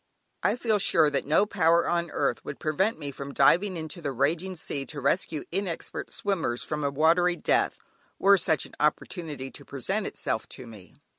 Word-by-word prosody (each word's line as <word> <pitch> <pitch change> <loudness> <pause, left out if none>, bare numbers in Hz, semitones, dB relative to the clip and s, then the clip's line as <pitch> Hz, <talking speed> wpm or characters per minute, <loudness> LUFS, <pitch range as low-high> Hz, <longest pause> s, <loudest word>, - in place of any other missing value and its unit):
I - - +2
feel 225 -4 +1
sure 155 -5 +4
that 140 - -1
no 160 +7 +4
power 170 -4 +3
on 170 -1 0
earth - - -1
would - - -7
prevent 190 +8 0
me 145 -3 -5
from 140 +1 -8
diving 180 +7 +4
into 160 +2 -6
the 145 -3 -2
raging 160 +8 0
sea 145 -4 -4
to 150 - -5
rescue 155 +1 0
inexpert 185 -2 -3
swimmers 165 -12 -1
from 150 -1 -3
a 140 - +1
watery 165 +5 +3
death, - - +1 0.4
were 200 0 +5
such 160 -3 +1
an - - -14
opportunity 150 -2 -2
to - - -11
present 190 - -2
itself 110 - -3
to - - -9
me. 105 -6 -13
160 Hz, 180 wpm, -27 LUFS, 140-185 Hz, 0.4 s, were